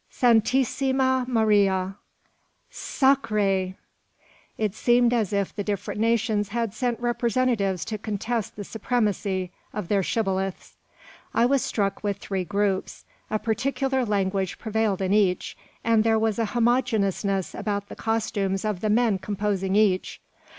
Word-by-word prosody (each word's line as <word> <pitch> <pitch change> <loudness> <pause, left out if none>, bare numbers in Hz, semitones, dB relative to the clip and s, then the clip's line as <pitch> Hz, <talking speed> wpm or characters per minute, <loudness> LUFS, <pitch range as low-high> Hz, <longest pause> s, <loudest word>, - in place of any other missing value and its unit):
"Santisima 260 +2 +2
Maria!" 200 -5 +2 0.8
"Sacr 270 -3 +1
r 215 - -2
re!" 190 -2 +1 0.8
It 215 -3 -1
seemed 240 +2 +3
as 220 -5 +1
if 200 -2 -1
the 205 - -2
different 205 +1 -3
nations 220 -3 +1
had 230 -1 -2
sent 240 0 -1
representatives 235 -6 0
to 215 -1 -4
contest 220 +2 -3
the 205 - -6
supremacy 205 -4 -1 0.2
of 210 -5 -5
their 200 -2 +3
shibboleths. 195 -2 -2 0.6
I 230 - +4
was 270 +1 +3
struck 200 -2 -1
with 205 -2 -1
three 190 -2 -3
groups. 200 -1 -1 0.2
A 215 - +1
particular 265 +4 0
language 195 -3 -1
prevailed 220 -3 -1
in 190 +1 +1
each; 195 -4 +1 0.3
and 225 -1 +3
there 225 0 +3
was 220 0 0
a 225 - +2
homogeneousness 220 -6 +1
about 205 -1 -3
the - - -9
costumes 210 -3 -1
of 210 -4 -1
the 215 - -1
men 220 -2 +2
composing 200 -1 -1
each. 205 -3 +2
215 Hz, 135 wpm, -25 LUFS, 195-235 Hz, 0.8 s, I